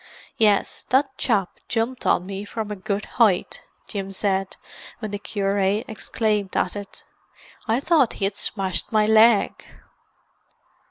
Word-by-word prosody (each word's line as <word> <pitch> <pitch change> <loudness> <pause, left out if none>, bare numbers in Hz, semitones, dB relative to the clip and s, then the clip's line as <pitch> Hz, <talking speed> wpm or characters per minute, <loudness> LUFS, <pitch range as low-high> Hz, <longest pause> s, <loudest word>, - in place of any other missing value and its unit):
"Yes, 210 -3 +2
that 265 +1 +2
chap 205 -8 0
jumped 235 +3 -2
on 180 - +2
me 195 +1 -5
from 210 0 -5
a - - -3
good 200 +2 -3
height," 215 -7 +1 0.2
Jim 195 -2 -5
said 195 -1 -1 0.4
when 215 -3 -6
the 205 - -4
cure 200 -1 -1
exclaimed 210 0 -1
at 180 - 0
it. 205 -1 -9 0.6
"I 225 +3 +2
thought 290 -4 +3
he 195 - -2
had 195 - 0
smashed 190 -4 0
my 215 -1 +3
leg." 220 0 +4
210 Hz, 140 wpm, -23 LUFS, 195-225 Hz, 0.6 s, leg